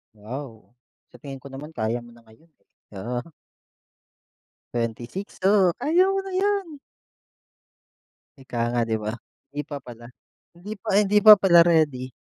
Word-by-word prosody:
Wow, 115 +2 -9 0.4
sa - - -15
tingin 135 -3 -9
ko 140 - -11
naman 150 +4 -9
kaya 115 +2 -1
mo 120 0 -14
na 115 - -20
ngayon, 110 +9 -22 0.2
eh, - - -56 0.3
oo. 120 +5 -4 1.5
26 120 - -5
oh, 195 -3 +4
kaya 360 +5 +3
mo 390 - 0
na - - -6
yan. 385 -6 -1 1.6
Ika 125 -2 -8
nga 120 0 0
'di 110 -1 -1
ba? 105 0 -3 0.4
Hindi 145 +1 -4
pa 145 -1 -6
pala, 120 -2 -12 0.5
hindi 175 +5 -10
pa - - -8
hindi 205 0 +3
pa 215 - +13
pala 175 -3 +7
ready. 145 -7 +1
140 Hz, 145 wpm, -24 LUFS, 120-195 Hz, 1.6 s, pa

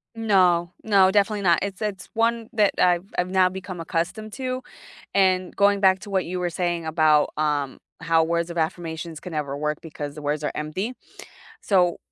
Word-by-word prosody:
No 185 -6 +3
no, 195 -3 +4
definitely 205 +1 +2
not, 175 -3 +4
it's 200 +1 -4
it's 205 -3 -4
one 230 0 0
that 210 -3 +3
I've 175 0 +3
I've 180 +1 0
now 185 -1 +4
become 185 -1 -7
accustomed 175 +6 -3
to, 255 -1 -4 0.5
and 185 -1 +2
going 200 0 +3
back 190 -1 +4
to 205 - -10
what 190 -2 0
you 180 +1 -4
were 175 -1 -1
saying 175 -1 -2
about, 155 -1 +3
um, 145 -3 -1 0.2
how 165 0 +2
"Words 170 +1 -1
of 170 - -6
affirmations 160 -1 -3
can 180 - -9
never 145 -3 -3
work 150 0 -1
because 150 -2 -7
the 150 - -8
words 150 +1 -2
are - - -1
empty," 170 +10 -3 0.7
so, 180 -4 +2
180 Hz, 185 wpm, -24 LUFS, 160-195 Hz, 0.7 s, no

